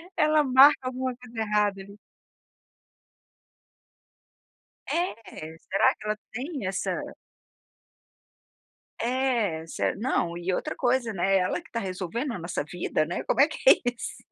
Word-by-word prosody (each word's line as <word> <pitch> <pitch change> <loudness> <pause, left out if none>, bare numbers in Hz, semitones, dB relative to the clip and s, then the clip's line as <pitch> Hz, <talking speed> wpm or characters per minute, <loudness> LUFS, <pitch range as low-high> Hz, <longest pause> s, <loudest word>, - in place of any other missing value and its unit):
ela 305 0 +4
marca 270 +2 +7
alguma 255 0 -3
coisa 240 -2 -10
errada 210 -2 +1
ali. 200 +1 -13 2.9
É, 215 - -4
será 195 +4 +2
que - - -13
ela 215 0 -1
tem 265 - -5
essa 190 - -2 2.1
É, 235 -10 0
se - - -1
não 195 -6 -1
e 175 +2 -2
outra - - -2
coisa, 240 -3 +1
né, 195 +1 +2
"Ela 180 - 0
que - - -18
está 230 - -3
resolvendo 195 - -3
a 185 - -5
nossa 170 -3 -3
vida, 165 -1 -1
né, 170 - -4
como - - -1
é 290 - +7
que 315 - -8
é - - +11 0.2
isso". 245 - -8
220 Hz, 135 wpm, -27 LUFS, 185-255 Hz, 2.9 s, é